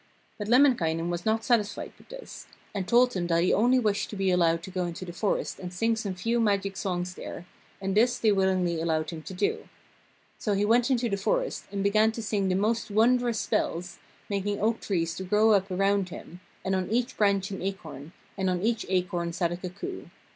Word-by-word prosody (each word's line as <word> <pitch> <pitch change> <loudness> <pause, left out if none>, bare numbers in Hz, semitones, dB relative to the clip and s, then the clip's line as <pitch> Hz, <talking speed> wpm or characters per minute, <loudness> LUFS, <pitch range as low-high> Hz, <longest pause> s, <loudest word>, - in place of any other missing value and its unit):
But 205 - -4
Lemminkainen 185 - +3
was 175 +3 -3
not 220 +1 +1
satisfied 215 -4 0
with - - -21
this, - - -10 0.3
and 195 -3 -3
told 245 +4 +5
them 180 -5 -2
that 170 0 +2
he 180 - +3
only 245 +5 +4
wished 210 -4 0
to - - -6
be 195 -1 +1
allowed 170 -2 +2
to 190 - -8
go 180 -1 -1
into 175 +2 -6
the 175 - -7
forest 200 +3 -1
and 180 -1 -6
sing 225 +5 +1
some 205 -4 -4
few 230 +6 0
magic 200 -3 +1
songs 180 -1 -2
there, 175 - -8 0.3
and 195 0 -2
this 240 +3 +4
they 220 - +3
willingly 185 -4 +1
allowed 160 -1 0
him 165 -2 -7
to 190 - -8
do. 200 +3 -1 0.7
So 210 - 0
he 200 +1 +1
went 235 +3 +3
into 245 -2 +2
the 200 -3 -1
forest - - -1
and 200 -1 -2
began 215 +2 +4
to 230 - -5
sing 205 -3 0
the 185 - +1
most 220 +3 0
wondrous 235 +2 +3
spells, 175 +1 -2 0.3
making 200 0 -2
oak 225 +2 +1
trees 165 -4 -1
to 190 - -4
grow 210 +4 +3
up 195 -2 +3
around 195 0 +1
him, 175 0 -10 0.3
and 190 - 0
on 185 -1 -2
each 240 +3 0
branch 200 -2 +2
an 195 - -5
acorn, 165 -6 -6 0.3
and 190 -1 +1
on 180 0 -1
each 230 0 0
acorn 180 -2 -1
sat 175 -1 0
a 175 - -3
cuckoo. 185 - -7
195 Hz, 210 wpm, -27 LUFS, 180-220 Hz, 0.7 s, told